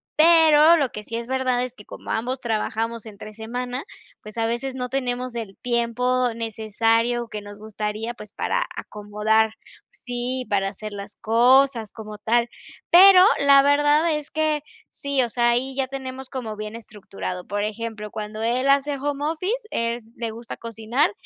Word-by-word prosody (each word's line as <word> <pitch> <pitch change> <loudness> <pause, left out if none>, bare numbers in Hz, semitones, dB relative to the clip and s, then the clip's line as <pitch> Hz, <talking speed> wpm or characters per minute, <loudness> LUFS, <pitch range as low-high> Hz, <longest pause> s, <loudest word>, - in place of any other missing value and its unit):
pero 320 0 +7
lo 280 -6 +1
que 210 0 -8
sí 230 - -5
es 235 0 -4
verdad 255 -1 0
es 250 -1 -5
que 210 -4 -15
como - - -8
ambos 250 +3 -2
trabajamos 225 0 -2
entre 215 0 -10
semana, 245 +4 -5 0.4
pues, 215 +1 -12
a 225 - +1
veces 240 +3 -2
no 250 -1 -3
tenemos 250 -1 -2
el 215 -4 -6
tiempo 245 +1 0
necesario 230 +2 0
que 210 - -6
nos 205 0 -11
gustaría, 215 +2 -4
pues, 210 -3 -12
para - - -1
acomodar 215 +1 0 0.4
Sí, 250 +1 -4
para 195 -1 +1
hacer 215 +2 -8
las 200 -1 -8
cosas 240 0 +3
como 215 -2 -9
tal, 235 +3 +1 0.4
pero 370 +1 +9 0.2
la 280 -1 +8
verdad 295 +3 +3
es 295 - -9
que 310 -2 0 0.3
sí, 280 -1 -1
o 240 - -2
sea, 240 +1 +2
ahí 260 +3 0
ya 265 -1 0
tenemos 265 -1 -7
como 235 -5 -5
bien 215 +1 -6
estructurado. 195 -5 -7
Por 205 +1 -2
ejemplo, 215 0 -5
cuando 215 +1 -6
él 245 +4 +1
hace 280 +1 +3
home 285 +1 -3
office, 330 +6 -1 0.2
es 230 -1 -2
le 230 -2 -3
gusta 230 +1 -8
cocinar 230 +3 0
235 Hz, 165 wpm, -23 LUFS, 220-265 Hz, 0.4 s, pero